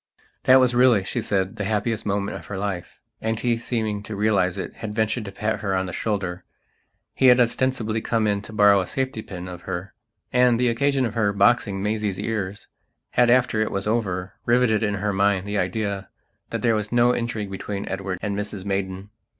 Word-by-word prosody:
That 130 +1 +8
was 125 -1 +3
really, 120 -5 +5
she 110 +5 -2
said, 95 -3 -1
the 105 - -2
happiest 110 +2 -1
moment 100 0 -1
of 85 -4 -9
her 100 - -5
life. 95 -3 -4 0.2
And 110 0 -1
he, 120 -1 +1
seeming 110 -3 -2
to 105 +1 -7
realize 100 -3 +1
it, 95 - -6
had 105 -2 -6
ventured 110 +1 0
to 100 - -6
pat 110 +2 -2
her 95 -2 -1
on 95 0 0
the 90 - -6
shoulder. 95 -4 -2 0.7
He 130 - +3
had, 125 0 +7
ostensibly, 115 -2 +1
come 115 -1 0
in 100 -1 +1
to 100 - -10
borrow 105 -2 +5
a 90 - -5
safety 130 -4 -2
pin 90 -3 -8
of 90 -1 -8
her. 90 +2 -4 0.4
And 125 -1 +4
the 125 -1 +3
occasion 135 +2 +1
of 110 - -3
her 110 -3 +1
boxing 100 -1 +2
Maisie's 105 -2 -1
ears, 105 -2 -3 0.4
had, 120 -1 +4
after 120 -3 +3
it 110 - +1
was 100 0 -2
over, 95 -4 -1
riveted 120 -2 +3
in 105 -2 0
her 100 +1 -1
mind 100 -1 +2
the 105 0 -1
idea 100 +1 -2 0.4
that - - -4
there 115 -2 +4
was 105 -1 -2
no 120 0 +4
intrigue 115 -4 -3
between 100 +1 -5
Edward 95 -1 -3
and 100 -1 -1
Mrs 105 -1 -5
Maidan. 95 0 -3
105 Hz, 205 wpm, -23 LUFS, 100-115 Hz, 0.7 s, That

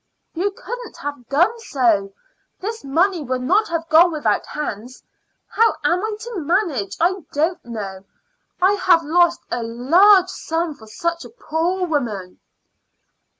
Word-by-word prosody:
"You 360 +5 0
couldn't 485 +4 -8
have 285 -5 -7
done 350 - +2
so. 230 - +1 0.5
This 445 +4 -5
money 340 +6 +1
would 255 -1 -3
not 405 +10 +2
have 330 -1 -3
gone 335 +3 +6
without 260 -10 0
hands. 250 -4 -6 0.4
How 455 0 +2
am 360 +1 +2
I 435 -1 -2
to 465 -4 -5
manage 295 - -1
I 360 +3 +2 0.2
don't 320 +5 0
know. 200 -5 -7 0.6
I 375 +2 +4
have 355 -4 +3
lost 345 +2 +2
a 240 - -1
large 350 - +4
sum 325 -2 -3
for 220 -6 -16
such 335 +9 -3
a - - -11
poor 360 -3 -2
woman." 225 - -3
330 Hz, 145 wpm, -20 LUFS, 250-370 Hz, 0.6 s, gone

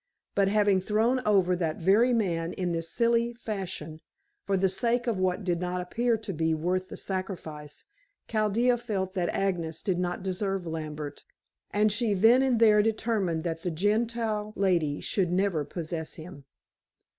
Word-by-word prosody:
But 200 -1 +3
having 205 -2 +3
thrown 220 +6 +2
over 190 -3 +4
that 165 -3 -2
very 205 +8 +4
man 175 -8 0
in 180 -2 -2
this 165 -1 -3
silly 235 +1 +1
fashion, 185 -8 -5 0.5
for 195 -1 +2
the 190 +1 +3
sake 235 +6 0
of 230 -6 -1
what 185 +2 0
did 175 -2 0
not 180 0 -2
appear 230 +6 0
to 210 -3 -6
be 160 0 +1
worth 185 +4 -1
the - - -8
sacrifice, 165 -6 -6 0.4
Chaldea 230 +3 +2
felt 195 -6 -3
that 180 -3 0
Agnes 170 -5 -2
did 185 -3 0
not 180 0 -2
deserve 195 0 -2
Lambert, 155 -3 -5 0.5
and 210 +1 +2
she 215 -1 0
then 225 +7 +6
and 260 -4 +2
there 215 -2 +6
determined 210 -6 0
that 165 -2 -3
the 180 - -2
Gentile 215 +3 -1
lady 170 -7 +1
should 185 -4 0
never 185 -4 +1
possess 160 +1 -5
him. 160 -3 -11
190 Hz, 160 wpm, -28 LUFS, 170-215 Hz, 0.5 s, then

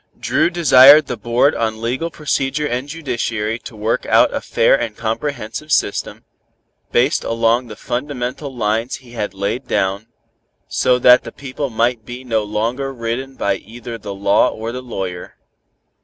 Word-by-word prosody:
Dru - - +1
desired 150 -4 +7
the 125 - -4
Board 120 +5 +2
on 110 -1 -2
Legal 125 +9 -2
Procedure 150 -2 -1
and 130 +1 -3
Judiciary 120 -7 -3
to 115 - -11
work 110 +2 -1
out - - +4
a - - -2
fair 115 - +2
and 115 -5 -1
comprehensive 115 +4 -4
system, 100 - 0 0.7
based 130 +6 +2
along 115 +2 +1
the 105 - -9
fundamental 130 +2 -4
lines 115 0 -1
he 125 -3 -14
had 105 -4 -4
laid 100 +7 -3
down, 100 +3 -1 0.6
so 65 - +2
that 125 0 +6
the - - -8
people 140 +1 -5
might 115 0 0
be 125 +3 -8
no 115 -3 0
longer 115 +6 -2
ridden 130 +2 -4
by 100 - 0
either 115 +2 -9
the 100 -1 -7
law 100 0 +3
or 110 +1 -5
the 125 +1 -6
lawyer. 95 -7 -6
120 Hz, 155 wpm, -18 LUFS, 110-130 Hz, 0.7 s, desired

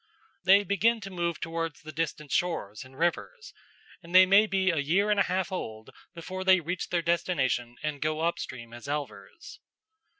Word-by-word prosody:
They 195 +2 +6
begin 210 +4 +2
to 195 -1 -8
move 170 -3 -2
towards 165 -1 -4
the 155 - -8
distant 150 -2 -4
shores 120 - -1
and 130 +1 -16
rivers, 410 - -2 0.5
and 170 +1 -8
they 185 0 +9
may 200 +3 +5
be 190 -2 +2
a 160 - -1
year 185 +9 +1
and 205 - +2
a - - +5
half 185 +1 -1
old 110 -11 -6 0.2
before 185 +3 -6
they 190 -1 +5
reach 175 +2 -4
their 170 -1 0
destination 130 -8 0
and 150 -2 -3
go 155 +1 -1
up 170 +1 0
stream 115 -2 -8
as 120 +3 -10
elvers. 145 - -6
170 Hz, 180 wpm, -28 LUFS, 145-185 Hz, 0.5 s, they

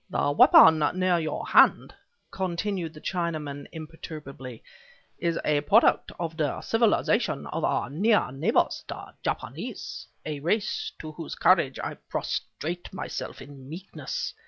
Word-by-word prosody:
"The 145 - +1
weapon 155 +2 +8 0.2
near 185 -1 +2
your 155 -2 -3
hand," - - +5 0.4
continued 180 -2 -3
the 155 - -11
Chinaman, 155 -6 -3
imperturbably, 150 -6 -9 0.6
"is 170 -1 0
a 150 -1 +2
product 210 +11 +4
of 165 -2 -3
the 150 -4 -1
civilization 225 -1 +1
of - - -4
our - - +1
near 200 - +2
neighbors, 160 - +1
the - - -8
Japanese, - - -5 0.2
a 150 -2 -4
race 200 +8 -1
to 155 - -7
whose 160 +1 -7
courage 170 -7 +3
I - - -5
prostrate 175 +3 -4
myself - - -6
in 140 -2 -13
meekness. 180 +5 -5
160 Hz, 130 wpm, -27 LUFS, 145-185 Hz, 0.6 s, weapon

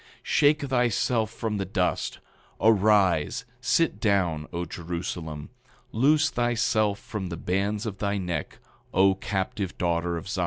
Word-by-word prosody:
8:25 - - -25 0.2
Shake 150 +1 +3
thyself 120 -3 +1
from 110 -2 -3
the 95 - -2
dust; 90 -2 -1 0.4
arise, 100 -7 +3
sit 125 -1 +1
down, 90 -8 +1
O 85 +1 -3
Jerusalem; 85 -3 -5 0.4
loose 145 +7 +3
thyself 115 -4 +1
from 100 -4 -6
the 85 - -5
bands 100 +5 -1
of 100 -3 -5
thy 100 0 0
neck, 90 -5 -4 0.4
O 95 +1 +5
captive 95 0 -3
daughter 85 0 0
of 85 - -7
Zion. 95 - -3
100 Hz, 140 wpm, -26 LUFS, 90-110 Hz, 0.4 s, O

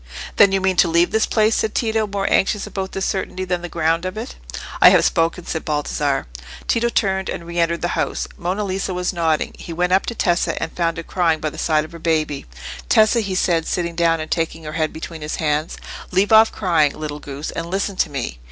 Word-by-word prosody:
"Then 200 - +7
you 195 - +2
mean 190 -1 +1
to - - +5
leave 170 +1 +3
this 220 0 +2
place?" 220 0 +2
said 220 - -1
Tito, 220 -2 +1
more 200 -1 -2
anxious 200 +1 +2
about 190 -1 -5
this 195 - -2
certainty 185 -1 -2
than 180 -1 -1
the 175 - -6
ground 165 0 0
of 185 +3 -4
it. 230 +4 -5 0.5
"I - - +10
have - - +4
spoken," 165 +1 +1
said 160 - -3
Baldassarre. 145 -2 -1 0.4
Tito 235 +1 +2
turned 190 -4 0
and 170 - -5
re 170 0 -4
entered 170 0 +1
the 175 - +1
house. - - -1
Monna 185 +4 -2
Lisa 190 -1 -2
was 180 +1 -1
nodding; 165 -3 0
he - - -8
went 180 +2 +1
up 190 - +3
to 235 - -3
Tessa, 175 -4 +1
and 165 - -3
found 165 -1 0
her 165 - -4
crying 165 -2 +1
by 155 -1 -2
the - - -9
side 155 -1 +2
of - - -13
her 170 - -10
baby. 155 - -1 0.4
"Tessa," 220 +2 +5
he 200 -4 -2
said, 170 -3 +1
sitting 170 -1 -1
down 165 -1 +2
and 155 - -6
taking 165 -1 -1
her 155 0 -6
head 155 -1 0
between 160 0 -8
his 150 0 -3
hands; 155 0 -1 0.3
"leave 190 +3 +1
off 220 0 +7
crying, 165 -7 +1
little 150 -1 -5
goose, 145 +1 -6
and 165 - -4
listen 195 +1 -1
to - - +1
me." 125 - -4
170 Hz, 230 wpm, -20 LUFS, 160-190 Hz, 0.5 s, I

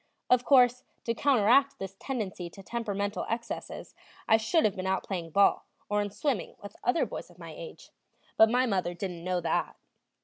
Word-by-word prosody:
Of 250 -1 +5
course, 250 -1 +5 0.2
to 230 - 0
counteract 270 +2 +3
this 195 0 -7
tendency 200 -9 -4
to 195 +3 -13
temperamental 205 -2 -3
excesses 230 +1 -5 0.3
I 220 - +6
should 225 +9 +2
have 205 - +1
been 185 0 -4
out 190 0 0
playing 175 -4 -4
ball 200 +5 +3 0.2
or 205 0 +1
in 205 - -2
swimming 215 - -2
with 205 - -10
other 245 +7 +2
boys - - -7
of - - -19
my - - -9
age; - - -11 0.4
but 220 - +6
my 250 +2 +3
mother 185 -6 -1
didn't 175 -2 -5
know 180 0 -1
that. 165 -1 -1
210 Hz, 180 wpm, -29 LUFS, 190-245 Hz, 0.4 s, I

